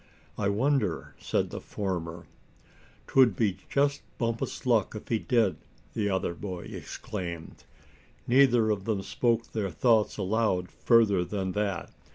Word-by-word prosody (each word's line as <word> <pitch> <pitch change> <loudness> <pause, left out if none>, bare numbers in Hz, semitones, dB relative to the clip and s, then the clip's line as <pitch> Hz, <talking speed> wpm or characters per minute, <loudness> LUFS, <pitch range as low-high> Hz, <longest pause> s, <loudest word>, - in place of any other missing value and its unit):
"I 100 -1 0
wonder," 110 - 0
said - - -1
the - - -5
former. 85 -4 -4 0.8
"'Twould 125 -7 +4
be 105 -5 +1
just 140 0 +2 0.2
Bumpus' 115 +1 -2
luck 115 -5 +2
if 105 - -8
he 115 - +1
did," 115 -6 +2 0.4
the 105 -2 0
other 95 -2 0
boy 90 0 -6
exclaimed. 85 -5 -7 0.6
Neither 120 -3 +5
of 100 -2 -2
them 105 -4 -1
spoke 115 +3 0
their 105 -3 -1
thoughts 110 +2 +2
aloud 95 -4 0
further 110 -5 +4
than 95 0 -3
that. 100 -3 -2
105 Hz, 135 wpm, -28 LUFS, 95-115 Hz, 0.8 s, Neither